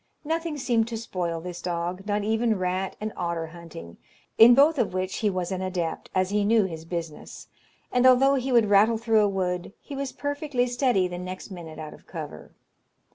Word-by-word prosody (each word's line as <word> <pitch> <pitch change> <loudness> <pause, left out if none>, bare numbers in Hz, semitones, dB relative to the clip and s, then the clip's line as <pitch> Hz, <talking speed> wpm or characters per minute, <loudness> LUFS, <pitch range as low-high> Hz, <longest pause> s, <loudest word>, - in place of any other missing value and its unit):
Nothing 325 0 -2
seemed 235 -5 +1
to 230 -1 -4
spoil 180 -7 -3
this 175 0 -7
dog, 175 +2 -3
not 205 0 0
even 220 +1 +1
rat 185 +1 -2
and 215 0 -4
otter 170 -2 -2
hunting, 160 - -11 0.4
in 240 +2 +8
both 290 +2 +5
of 210 - 0
which 185 0 -2
he 215 - +1
was 185 -1 -3
an 190 0 -2
adept, 180 -3 -3
as 185 0 +1
he 205 0 +2
knew 220 +1 +4
his 165 -4 -5
business; 165 -2 -7 0.4
and 250 +1 +4
although 265 +2 +6
he 265 -1 -1
would 235 -3 +5
rattle 210 +3 +4
through 225 -1 +3
a 205 - +3
wood, 180 -1 -2
he 285 - -9
was 275 -1 -3
perfectly 285 -3 -1
steady 245 -6 +1
the 175 0 -6
next 185 +2 -7
minute 165 -4 -9
out 155 -1 -7
of - - -17
cover. - - -8
200 Hz, 195 wpm, -26 LUFS, 180-240 Hz, 0.4 s, in